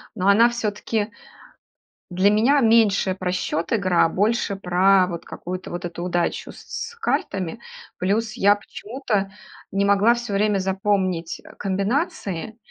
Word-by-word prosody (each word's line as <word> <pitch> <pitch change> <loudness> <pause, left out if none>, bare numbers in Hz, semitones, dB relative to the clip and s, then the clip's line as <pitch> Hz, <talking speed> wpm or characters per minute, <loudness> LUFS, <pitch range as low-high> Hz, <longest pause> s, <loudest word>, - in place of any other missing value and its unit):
но 190 -2 -1
она 225 +4 +6
всё-таки 215 -1 -2 1.0
для 185 +3 +3
меня 240 +7 +4
меньше 220 -4 +4
про 185 -1 -3
счет 165 -2 -2
игра, 185 -7 +3
а - - +1
больше 205 +2 0
про 185 0 +3
вот 170 -2 -6
какую-то 185 +1 -7
вот 175 0 -5
эту 175 0 -6
удачу 175 -1 -1
с 470 - -7
картами. 195 - -2 0.4
Плюс 215 +4 0
я 205 -3 +4
почему-то 210 -2 -4 0.4
не 200 +1 +1
могла 200 +4 +4
всё 240 -3 -5
время 205 0 +2
запомнить, 190 -3 -1
э, - - -14
комбинации, 200 - -2
200 Hz, 135 wpm, -23 LUFS, 185-220 Hz, 1.0 s, она